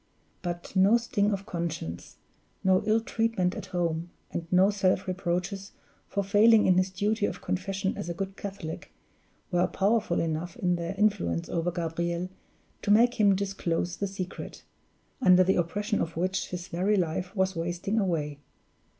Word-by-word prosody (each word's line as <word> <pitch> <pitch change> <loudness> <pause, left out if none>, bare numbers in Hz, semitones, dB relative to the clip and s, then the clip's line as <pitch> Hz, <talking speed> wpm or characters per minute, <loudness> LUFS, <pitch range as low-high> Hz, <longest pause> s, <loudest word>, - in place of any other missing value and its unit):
But 175 +1 -5
no 195 +5 +6
sting 230 -3 0
of 200 -1 -3
conscience, 165 - -4 0.5
no 190 0 +4
ill 220 +1 +4
treatment 225 -6 0
at - - -7
home, 170 -1 -1 0.2
and 165 -1 -4
no 185 +2 +5
self 195 -1 +1
reproaches 185 +2 -2 0.3
for 200 - -1
failing 215 +3 +5
in 185 -1 +5
his 185 +1 +1
duty 205 +3 0
of - - -6
confession 190 +1 -2
as 170 - -5
a 170 - -3
good 195 +1 -4
Catholic, 195 -6 -6 0.6
were 175 0 +3
powerful 205 -2 +1
enough 165 +1 -2
in 180 -1 +1
their 170 +2 -4
influence 85 - +1
over 170 +1 0
Gabriel 170 +1 -2 0.5
to - - -4
make 235 +4 +5
him 200 -2 +5
disclose 180 -3 -2
the 200 - -1
secret, 190 -1 -6 0.6
under 185 -5 +7
the 190 +1 +2
oppression 205 +5 0
of 165 0 -3
which 185 +2 0
his 180 0 -6
very 190 +5 +1
life 180 +2 -2
was 190 -1 +1
wasting 175 +6 -1
away. 155 -7 -1
185 Hz, 160 wpm, -28 LUFS, 170-200 Hz, 0.6 s, under